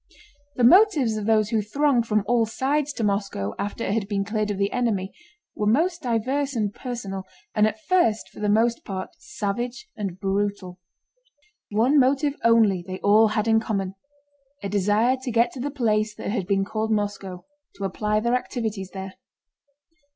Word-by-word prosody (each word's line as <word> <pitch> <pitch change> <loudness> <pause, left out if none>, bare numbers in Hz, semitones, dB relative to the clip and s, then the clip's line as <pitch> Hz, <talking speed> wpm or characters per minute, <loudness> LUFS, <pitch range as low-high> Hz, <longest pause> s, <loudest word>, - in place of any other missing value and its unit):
The 250 - 0
motives 300 - +5
of 215 -1 -3
those 215 -2 +3
who 220 -1 +1
thronged 245 +2 +1
from 215 -2 +1
all 230 +1 +2
sides 285 +5 0
to 235 - -4
Moscow 200 - -1
after 205 +3 -3
it - - -1
had 215 -3 -1
been 200 -1 -1
cleared 215 0 -1
of 205 - -2
the 200 +1 0
enemy 210 -6 -1 0.4
were 210 - -1
most 335 - +2
diverse 265 +3 -1
and 210 -3 -1
personal, 225 -7 -5 0.3
and 210 0 +4
at 220 0 -4
first 350 -13 +2
for - - -14
the 210 0 0
most 230 +3 +2
part 190 -2 -5
savage 240 - -4
and 190 -3 -5
brutal. 195 -2 -2 0.9
One 240 +8 +3
motive 275 +2 +2
only 220 -6 +4
they 185 0 -4
all 215 +2 +5
had 215 +1 -1
in 225 0 +4
common: 195 -4 -2 0.7
a 200 - -2
desire 210 +6 +2
to 260 - -4
get 235 0 +2
to 265 - -9
the 280 +4 -2
place 215 -6 0
that - - -4
had 195 -5 -2
been 195 -1 +1
called 220 +1 -2
Moscow, 205 -3 -3 0.3
to 200 - -7
apply 210 +2 0
their 235 +2 0
activities 220 -6 -2
there. 190 0 -6
215 Hz, 175 wpm, -24 LUFS, 200-240 Hz, 0.9 s, motives